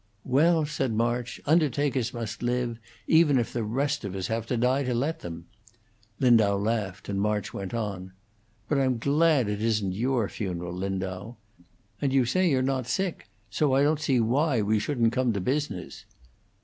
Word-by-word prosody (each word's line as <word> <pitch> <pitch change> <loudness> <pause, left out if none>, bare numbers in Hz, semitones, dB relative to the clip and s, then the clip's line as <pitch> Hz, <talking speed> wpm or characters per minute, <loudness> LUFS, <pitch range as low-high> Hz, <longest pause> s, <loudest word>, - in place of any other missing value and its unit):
"Well," 155 +5 +3
said 135 -5 -2
March, 120 +2 -1
"undertakers 145 -5 +1
must 115 -3 -5
live, 120 -1 -1 0.3
even 160 -4 +4
if 120 - -1
the 120 - -1
rest 140 +6 -1
of 100 -2 -5
us 95 -1 -3
have 115 0 -2
to 125 - -1
die 125 +4 +2
to 125 -3 -1
let 150 +7 -1
them." 85 -1 -8 0.7
Lindau 110 -6 +4
laughed, 100 -2 -2
and 100 -1 -1
March 105 0 -1
went 95 -2 -5
on: 100 -5 -4 0.6
"But 145 - +1
I'm 130 -2 +1
glad 145 0 +3
it 105 0 -2
isn't 110 -4 +1
your 120 +2 0
funeral, 90 -4 -4
Lindau. 95 +3 -4 0.7
And 140 - +1
you 135 -2 +3
say 185 +9 +2
you're 130 -3 +2
not 130 -2 -1
sick, 185 +7 -1
and - - -32 0.2
so 140 +2 +2
I 135 - +4
don't 150 +1 +2
see 135 -5 +1
why 125 +1 +2
we 105 +1 +2
shouldn't 120 -2 +1
come 125 -2 +1
to 100 - -2
business." 125 -3 -3
120 Hz, 175 wpm, -27 LUFS, 105-140 Hz, 0.7 s, even